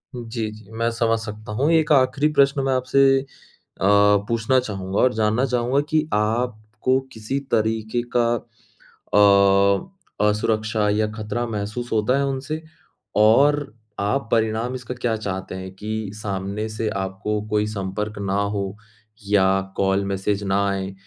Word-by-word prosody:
जी, 115 -2 -4
जी। 110 -1 -14
मैं 115 +1 -1
समझ 115 -1 +1
सकता 110 -1 -8
हूँ। 135 +7 +1
एक 160 -2 +3
आखिरी 140 +1 +4
प्रश्न 140 -1 +3
मैं 135 - +2
आपसे 135 +1 +3 0.6
अ, - - -1 0.4
पूछना 115 +3 +2
चाहूँगा 95 -4 -4
और 125 -1 +4
जानना 110 +3 +1
चाहूँगा 125 +2 +1
कि 155 0 +1
आपको 110 +3 0
किसी 110 +5 -3
तरीके 110 +2 0
का 120 - +4 0.7
अ, 100 - +2
असुरक्षा 110 0 0
या 105 +1 +1
ख़तरा 110 +2 -3
महसूस 110 +3 -4
होता 110 +4 +2
है 140 - +1
उनसे 140 +4 -3 0.5
और 135 +5 +4 0.3
आप 105 +6 0
परिणाम 115 +2 0
इसका 125 -1 -6
क्या 120 -2 -1
चाहते 95 -3 -5
हैं 95 0 -7
कि 110 +1 -4
सामने 100 0 -4
से 110 +1 -3
आपको 95 +2 -3
कोई 105 0 +1
संपर्क 105 +1 -4
ना 100 -1 -2
हो 100 -1 -2 0.5
या 100 -2 +4 0.3
कॉल 95 0 +2
मैसेज 100 +1 -1
ना 100 +1 +1
आए 95 0 -3
110 Hz, 140 wpm, -22 LUFS, 100-125 Hz, 0.7 s, आखिरी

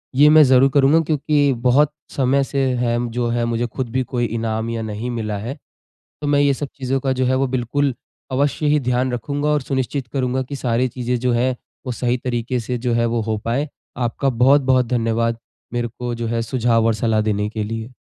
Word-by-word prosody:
ये 145 +3 +7
मैं 155 0 +8
ज़रूर 130 0 +5
करूँगा 140 +2 +5
क्योंकि 150 -2 +1
बहुत 145 +4 +4 0.2
समय 135 +1 +1
से 135 0 -1
है 120 -1 0
जो 120 +1 -1
है 120 0 0
मुझे 115 +1 -1
खुद 120 +1 -4
भी 130 +2 0
कोई 120 -1 -2
इनाम 115 0 -2
या 115 -1 -3
नहीं 110 +2 -4
मिला 110 -3 -3
है। 120 +8 -5 0.6
तो 150 - -3
मैं 145 0 +3
ये 140 -1 +3
सब 145 +1 -4
चीज़ों 135 0 -2
का 135 0 0
जो 130 0 0
है 130 - +2
वो 135 +1 +1
बिल्कुल 130 +2 0 0.4
अवश्य 140 +3 0
ही 150 0 +3
ध्यान 125 0 0
रखूँगा 140 +5 -2
और 150 -1 +2
सुनिश्चित 130 0 -2
करूँगा 130 -1 0
कि 140 +2 -6
सारी 125 -1 0
चीज़ें 125 0 -2
जो 125 0 +1
हैं 125 +2 +1 0.3
वो 125 - -2
सही 120 +1 0
तरीके 120 0 -1
से 125 +2 -3
जो 120 0 -1
है 115 0 +2
वो 115 0 0
हो 110 0 -1
पाए। 135 +6 -1 0.3
आपका 120 +3 -1
बहुत-बहुत 130 0 +4
धन्यवाद 115 -1 0 0.3
मेरे 120 -1 -1
को 120 -1 -3
जो 115 0 -4
है 115 0 -1
सुझाव 115 -1 +1
और 115 - +3
सलाह 110 0 +1
देने 105 -1 0
के 110 -1 -3
लिए। 115 +2 -5
125 Hz, 215 wpm, -20 LUFS, 115-135 Hz, 0.6 s, मैं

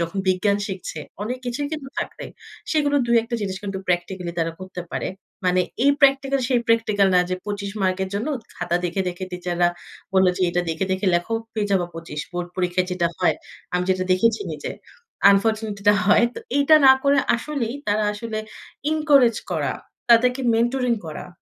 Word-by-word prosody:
যখন 170 +3 -2
বিজ্ঞান 200 +2 +2
শিখছে, 185 -5 -6 0.2
অনেক 245 +4 -3
কিছুই 285 +4 -2
কিন্তু 300 -4 -5
থাকবে। - - -5 0.5
সেগুলো 290 -2 +2
২ 235 - +2
১ 225 - -9
টা 235 - 0
জিনিস 190 -1 -3
কিন্তু 195 -1 -4
প্র্যাকটিক্যালি 175 0 -2
তারা 165 0 0
করতে 185 -1 -7
পারে। - - -2 0.4
মানে 180 0 +3 0.2
এই 280 - +6
প্র্যাকটিক্যাল 275 -1 +4
সেই 245 -2 +2
প্র্যাকটিক্যাল 215 -3 +3
না 180 - +6
যে, - - +1
২৫ 200 -1 -4
মার্কের 190 0 0
জন্য 215 +9 -2 0.3
খাতা 175 - 0
দেখে, 180 +3 -1
দেখে 180 +1 -5
টিচাররা 175 -1 0 0.4
বলল 190 0 +4
যে - - 0
এটা 175 +1 +1
দেখে, 160 +4 -1
দেখে 190 +1 -1
লেখো 175 +6 0 0.2
পেয়ে 210 -2 -1
যাবা 180 -3 +2
২৫। 165 -2 -6
বোর্ড 175 0 -3
পরীক্ষায় 180 0 0
যেটা 175 -2 +1
হয়, 155 - +3 0.4
আমি 180 0 +1
যেটা 185 0 +1
দেখেছি 230 - +2
নিজে - - -5 0.6
unfortunately 215 +1 +1
এটা 205 0 +6
তো - - 0
হয়। 210 +3 +5
তো - - -5 0.2
এটা 285 +2 +6
না 265 - +10
করে 280 0 +4 0.2
আসলেই 245 -2 -3
তারা 210 +1 +1
আসলে 215 +1 -5 0.5
encourage 285 -7 +4
করা, - - 0 0.4
তাদেরকে 250 +3 +5
mentoring 240 0 +1
করা। 155 - -7
205 Hz, 180 wpm, -23 LUFS, 180-240 Hz, 0.6 s, না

